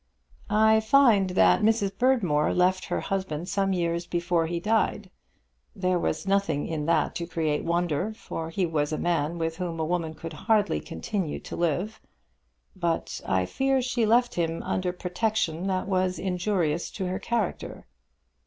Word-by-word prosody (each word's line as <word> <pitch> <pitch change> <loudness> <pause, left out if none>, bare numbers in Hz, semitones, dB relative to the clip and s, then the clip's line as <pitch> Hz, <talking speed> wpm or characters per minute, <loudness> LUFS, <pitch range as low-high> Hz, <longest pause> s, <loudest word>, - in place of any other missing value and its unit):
"I 220 0 +5
find 220 -4 +4
that 95 - +4
Mrs. 210 -3 +2
Berdmore 195 - +2
left 185 +1 +2
her - - -2
husband 180 -4 -3
some 195 0 0
years 170 -1 -1
before 170 -1 0
he 170 +1 -2
died. 210 -1 0 0.6
There 185 -1 +1
was 160 - -2
nothing 195 -7 +1
in 155 -2 -3
that 170 - +2
to 170 - -4
create 155 -3 -1
wonder, 170 +2 0
for 165 -7 -6
he 180 +2 0
was 155 -2 -1
a 155 - -1
man 170 -1 0
with 165 -1 -2
whom 175 -3 -4
a 160 - 0
woman 165 -1 -2
could 165 0 -7
hardly 205 - +1
continue 145 - -4
to - - -7
live. 175 +6 -1 0.7
But 170 -3 -2
I 95 -1 +1
fear 270 - +1
she 245 -3 0
left 240 +2 +3
him 165 -1 -2
under 185 -1 -1
protection 180 -1 -1
that 190 -1 -1
was 185 -1 0
injurious 180 -4 -1
to 190 - -3
her 185 +1 -2
character." 230 -6 -3
180 Hz, 160 wpm, -26 LUFS, 165-200 Hz, 0.7 s, I